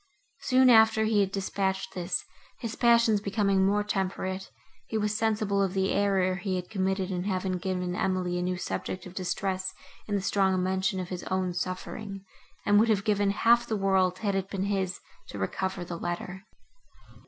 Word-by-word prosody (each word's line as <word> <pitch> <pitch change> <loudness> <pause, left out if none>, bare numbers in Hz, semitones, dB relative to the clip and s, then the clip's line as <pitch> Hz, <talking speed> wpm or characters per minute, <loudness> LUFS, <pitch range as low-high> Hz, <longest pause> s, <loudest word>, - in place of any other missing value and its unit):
Soon 255 -1 +5
after 220 -1 +6
he 215 -1 +2
had 195 -1 +2
dispatched 190 -1 -2
this, 180 0 -2 0.3
his 230 -3 -5
passions 235 -3 +4
becoming 200 -1 +1
more 205 +2 +2
temperate, 190 -1 -2 0.4
he 220 - -2
was 210 0 0
sensible 215 -2 +1
of 195 -1 0
the 190 0 +1
error 195 -2 +2
he 190 0 -2
had 180 -1 -5
committed 190 -1 -1
in 180 0 -2
having 185 -2 -1
given 180 -1 -2
Emily 180 -1 0
a - - -1
new 180 0 -1
subject 185 0 -4
of 180 - -10
distress 190 0 -2 0.3
in 205 - -1
the 200 - 0
strong 190 -2 +2
mention 190 +1 0
of 180 -1 -5
his 180 -1 -4
own 185 -1 -1
suffering, 195 +2 -5 0.4
and 205 0 +5
would 225 +2 +3
have 200 -2 +2
given 205 -2 +2
half 235 +4 +3
the 220 - -1
world, 190 -2 +2
had 205 -1 -1
it 195 0 -2
been 195 -1 -2
his, 195 -2 -1 0.3
to - - -8
recover 180 - -2
the 170 -1 -6
letter. 180 +2 -5
190 Hz, 180 wpm, -28 LUFS, 185-205 Hz, 0.4 s, after